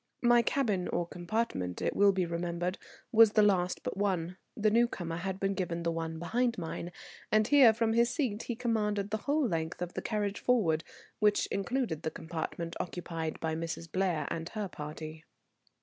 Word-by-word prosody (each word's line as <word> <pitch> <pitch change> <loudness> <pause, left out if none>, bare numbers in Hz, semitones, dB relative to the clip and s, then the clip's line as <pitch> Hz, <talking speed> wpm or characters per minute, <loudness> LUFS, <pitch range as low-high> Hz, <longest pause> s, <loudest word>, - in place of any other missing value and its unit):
My 240 0 +6
cabin 215 -7 0
or 175 - -1
compartment, 175 - -2
it - - -1
will 200 0 +6
be 185 -2 0
remembered, 170 +2 -2 0.3
was 225 -2 +7
the 215 - +5
last 185 -3 +2
but - - -4
one; 185 -3 -1 0.2
the 215 -1 +3
newcomer 200 -8 +1
had 190 +2 -3
been 195 0 +1
given 170 -3 -2
the 170 - +1
one 165 -1 -3
behind 235 +8 0
mine, 170 0 -5 0.4
and 215 0 +4
here 275 -5 +8
from 225 0 +1
his 235 +1 +4
seat 245 -5 -1
he 240 - -4
commanded 210 -4 0
the 215 - +1
whole 290 -2 +3
length 160 -3 -2
of 180 0 -4
the - - -3
carriage 205 -2 -1
forward, 170 -11 +2 0.4
which 210 -1 +3
included 200 - -1
the 160 - -1
compartment 165 +1 -5
occupied 165 -3 -4
by 160 -1 -1
Mrs. 165 0 -4
Blair 185 -5 0
and 165 0 -3
her 210 -2 -3
party. 155 0 -7
190 Hz, 180 wpm, -31 LUFS, 165-220 Hz, 0.4 s, here